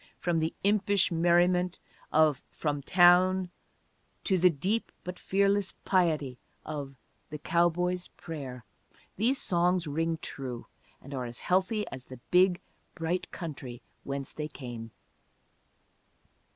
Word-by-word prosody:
From 170 -2 0
the 160 0 -1
impish 200 -1 +3
merriment 175 +1 +3 0.3
of 155 -3 +4
From 145 -2 -2
Town 180 +3 +5 0.7
to 190 -3 +2
the 180 +1 +6
deep 185 +9 -1
but 180 0 -6
fearless 200 0 +1
piety 155 -9 +1 0.3
of 145 -3 -5 0.3
The 150 - -5
Cowboy's 175 +3 +1
Prayer, 135 -7 -8 0.5
these 245 +7 +2
songs 175 0 +2
ring 165 +2 -1
true; 125 -3 -5 0.4
and 140 - -9
are 130 -2 -3
as 120 0 -4
healthy 195 +4 +1
as 130 -1 -8
the 130 - -10
big, 180 0 +5 0.4
bright 180 +1 -2
country 130 -8 -7 0.2
whence 140 -1 -4
they 150 -1 -4
came. 120 -6 -8
170 Hz, 120 wpm, -29 LUFS, 145-185 Hz, 0.7 s, the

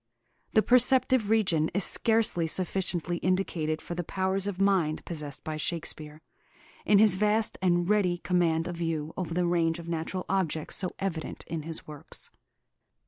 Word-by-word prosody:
The 215 - +4
perceptive 250 -2 +4
region 185 -8 +2
is 200 - +2
scarcely 220 -7 +2
sufficiently 175 -1 -1
indicated 170 -4 -1
for - - -6
the 175 0 -3
powers 190 +3 -1
of 195 -2 -4
mind 190 -6 +1
possessed 150 -4 -6
by 155 -1 -4
Shakespeare, 155 -1 -5 0.6
in 205 - +5
his 210 -2 +7
vast 210 +3 +2
and 175 -2 +1
ready 195 -4 +2
command 170 -2 0
of 175 -1 -6
view 160 -2 -3
over 170 -3 -4
the 180 0 +1
range 170 -1 +1
of 170 -1 -10
natural 170 +2 -3
objects 165 -5 -1
so 185 - +1
evident 170 -5 -5
in 165 -2 -5
his 160 +1 -6
works. 150 -2 -9
175 Hz, 155 wpm, -28 LUFS, 160-195 Hz, 0.6 s, his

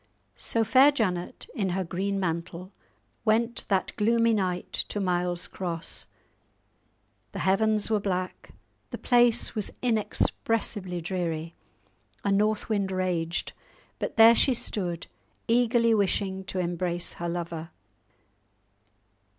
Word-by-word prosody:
So 230 - 0
fair 260 +6 +6
Janet 185 -10 -2
in 195 -4 -1
her 190 - 0
green 195 +3 -2
mantle 175 +1 -4 0.5
went 230 +2 +1
that 190 -2 0
gloomy 230 +2 +3
night 185 -4 -1 0.2
to 205 - -2
Miles 180 -2 0
Cross. 170 -3 -5 1.3
The - - -6
heavens 215 +3 +2
were 215 - +3
black, 185 -2 -3 0.4
the - - -5
place 240 -2 +3
was 215 -3 -1
inexpressibly 215 -4 0
dreary, 165 -2 -3 0.7
a 200 - +2
north 210 +2 +1
wind 200 -3 0
raged; 180 -3 -1 0.5
but - - -4
there 225 +1 +9
she 255 +2 +4
stood, 175 -7 -2 0.4
eagerly 235 0 +3
wishing 190 -2 0
to 190 - -5
embrace 175 -1 -1
her 170 - -2
lover. 170 -1 -4
195 Hz, 115 wpm, -27 LUFS, 175-225 Hz, 1.3 s, there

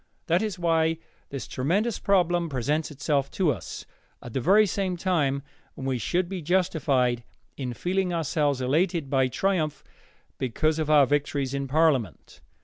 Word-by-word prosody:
That 175 +3 +2
is 210 -4 -2
why 165 -2 +2 0.3
this 135 -6 -6
tremendous 195 - 0
problem 175 -3 +2
presents 145 +4 -1
itself 145 -1 -1
to 180 -6 +3
us, 100 - -8 0.3
at 120 - -10
the 130 - -1
very 200 - +5
time 180 -8 0 0.3
when 135 - -7
we 130 -2 -1
should 175 +9 0
be 190 -1 -5
justified 145 -8 +1 0.3
in 125 -3 -4
feeling 185 +3 -1
ourselves 150 -4 0
elated 155 +2 0
by 135 -2 +3
triumph 155 0 -1 0.6
because 155 +5 0
of 155 -1 -1
our 150 -2 +6
victories 140 -1 -1
in 140 0 -2
parliament. 135 - 0
155 Hz, 145 wpm, -26 LUFS, 135-175 Hz, 0.6 s, our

